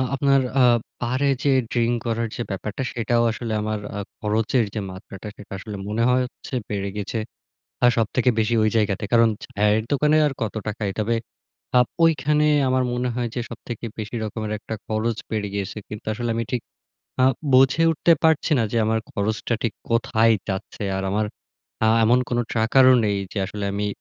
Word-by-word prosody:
আপনার 135 0 +3 0.2
আ - - +7 0.4
বারে 130 +4 +1
যেয়ে 135 -2 +4
ড্রিঙ্ক 120 0 +1
করার 115 0 -1
যে - - -4
ব্যাপারটা, 105 +5 -4
সেটাও 120 0 +1
আসলে 115 0 -4
আমার 110 0 -2 0.2
আ - - -2 0.2
খরচের 110 +2 +1
যে 110 - -2
মাত্রাটা 95 +2 -10
সেটা 105 - -13
আসলে 105 +1 -7
মনে 110 +2 0
হয় 130 +1 +3
হচ্ছে 125 - -12 0.2
বেড়ে 100 -1 -2
গেছে। 105 +3 -3 0.7
আ - - +8
সবথেকে 115 +3 +2
বেশি 110 +2 +1
ওই 110 - +3
জায়গাতে। 105 -1 0
কারণ 115 -1 +6 0.2
চায়ের 105 +1 +1
দোকানে 150 +2 +3
আর - - -2
কত 110 -1 -2
টাকাই? 105 -1 -2
তবে 115 +2 +1 0.6
আপ 125 - +4 0.2
ঐখানে 150 -2 +3 0.2
আমার 130 0 +2
মনে 125 0 -1
হয় 120 -1 -1
যে 125 - -1
সবথেকে 120 -1 -7
বেশি 110 +3 -5
রকমের 110 0 -4
একটা 110 - -7
খরচ 110 +1 -1
বেড়ে 105 -2 -1
গিয়েছে। 100 +1 -3
কিন্তু 105 -1 -8
আসলে 120 +2 -3
আমি 115 - 0
ঠিক 125 -2 0 0.6
আ - - +6 0.3
বুঝে 130 +4 +5
উঠতে 165 +2 +3
পারছি 160 0 +3
না 115 - +2
যে - - 0
আমার 110 0 +1
খরচটা 105 +3 -1
ঠিক 115 - 0 0.2
কোথায় 115 -1 +3 0.2
যাচ্ছে? 95 +1 -4
আর 95 - -3
আমার 105 +1 +1 0.6
আ - - +4 0.2
এমন 120 +3 +5
কোন 120 - 0
ট্র্যাকার 115 +4 +4
ও - - +6
নেই 100 -1 +1 0.2
যে - - -3
আসলে 105 0 -5
আমি 100 +1 -1
115 Hz, 180 wpm, -23 LUFS, 105-125 Hz, 0.7 s, আ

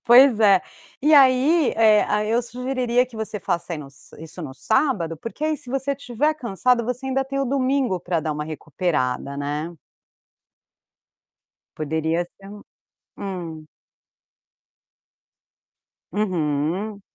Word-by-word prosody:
Pois 245 0 +7
é. 200 -3 +6 0.4
E 305 +2 +4
aí, 275 +3 +5
eh, 215 -2 +5
aí 210 +1 0
eu 235 +2 +2
sugeriria 250 0 0
que 240 - -13
você 215 -2 -4
faça 170 +1 -2
aí 160 - -3
no 145 - -8
s 135 -1 -14
isso 165 +2 -8
no 130 -3 -7
sábado 175 - 0
porque 230 - -6
aí 310 -1 +1
se 250 - -11
você 270 +1 -1
estiver 280 +2 0
cansado, 240 -1 +1
você 250 +2 -3
ainda 270 0 0
tem 275 +1 -4
o 275 - +1
domingo 260 -5 +1
pra 170 -2 -1
dar 155 0 -2
uma 150 0 -4
recuperada, 145 -3 -2
né. 150 +4 -3 2.0
Poderia 160 +2 -1
ser 195 +3 -17
um 205 0 -10 0.5
Hum. 170 -5 -6 2.4
Uhum. 185 +1 -1
210 Hz, 135 wpm, -23 LUFS, 160-255 Hz, 2.4 s, Pois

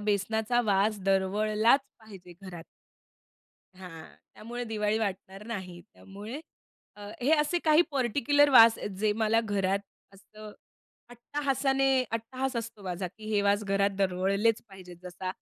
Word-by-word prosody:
बेसनाचा 220 +3 0
वास 205 +1 +1
दरवळलाच 210 +6 +2 0.2
पाहिजे 195 -5 -13
घरात. 175 -3 -9 1.1
हां. 180 -4 -11 0.3
त्यामुळे 240 +3 -7
दिवाळी 215 -1 -1
वाटणार 195 -1 -5
नाही. 185 -6 -7
त्यामुळे 210 +8 -9 0.6
अ, - - -10 0.2
हे 280 - +1
असे 325 +4 0
काही 310 +1 +5
पर्टिक्युलर 285 +2 +2
वास 230 -3 +8
आहेत - - -5
जे 210 0 +1
मला 225 +1 +3
घरात 195 -2 0 0.4
असतं 215 +2 -13 0.6
अट्टाहासाने, 270 +2 -1 0.2
अट्टाहास 255 +3 -3
असतो 230 -3 -6
माझा, 185 0 -4
की 215 - -13
हे 205 - +2
वास 205 +1 +1
घरात 200 0 +1
दरवळलेच 195 +3 +1
पाहिजेत. 185 -2 -13
जसा 185 +1 -6
210 Hz, 130 wpm, -28 LUFS, 195-235 Hz, 1.1 s, वास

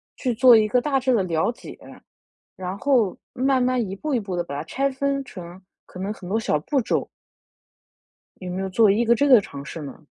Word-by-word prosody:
去 250 -3 -2
做 245 +1 +7
一 215 -1 +4
个 250 +4 +2
大 275 -1 0
致 260 0 +1
的 215 -5 +2
了 165 +3 0
解， 240 - -12 0.8
然 185 0 -5
后 245 -8 +2 0.2
慢 260 0 +1
慢 255 -1 +1
一 190 - -5
步 300 +7 -3
一 245 - +1
步 195 -3 -6
地 175 - 0
把 140 -4 -6
它 145 - -4
拆 275 +11 -1
分 275 +1 -1
成 180 -5 -11 0.2
可 180 - -11
能 200 +3 -3
很 180 -4 -11
多 210 +4 0
小 150 - 0
步 275 - 0
骤？ 230 - -1 1.3
有 185 - -7
没 185 +1 -3
有 190 - -3
做 215 +3 +4
一 210 +4 +2
个 235 - +5
这 285 +5 +2
个 255 -4 +8
尝 140 -7 -9
试 160 +1 -7
呢？ 145 +2 -9
220 Hz, 245 characters per minute, -23 LUFS, 185-255 Hz, 1.3 s, 个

